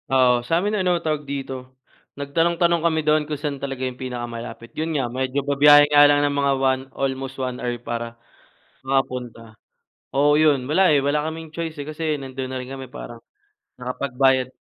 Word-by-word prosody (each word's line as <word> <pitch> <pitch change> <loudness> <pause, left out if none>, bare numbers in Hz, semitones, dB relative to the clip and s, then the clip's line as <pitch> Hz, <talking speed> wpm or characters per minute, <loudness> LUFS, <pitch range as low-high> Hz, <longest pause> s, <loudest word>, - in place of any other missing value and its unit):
Oo, 125 -2 +4
sa'min 170 - 0
ano 185 -4 +1
tawag 155 -3 -3
dito, 130 -2 -6 0.4
nagtanong-tanong 170 +4 +1
kami 160 -2 0
doon 155 0 +3
kung 150 - -2
san 140 -1 -4
talaga 135 -2 -3
yung 125 0 -6
pinakamalapit. 120 -2 -6
Yun 160 0 -2
nga, 135 - 0
medyo 130 +2 -2
babiyahe 145 +1 +7
nga 145 0 +8
lang 145 0 +3
ng 145 - 0
mga 140 -1 +2
one, 130 -1 +1 0.2
almost 135 0 -3
1 130 -1 -4
hour 120 -1 -2
para 115 0 -4 0.7
makapunta. 125 -4 -3 0.6
Oo, 145 +2 +4
yun, 145 -4 +3
wala, 180 +3 +4
eh, 145 - +4
wala 145 +2 0
kaming 160 +1 -5
choice, 165 -1 -3
eh, 140 - -6
kasi 155 -1 -2
nandun 130 -1 -6
na 130 - -3
rin 125 - -8
kami, 135 0 -7
parang 120 -4 -9 0.6
nakapagbayad 130 0 +1
140 Hz, 170 wpm, -22 LUFS, 130-150 Hz, 0.7 s, nga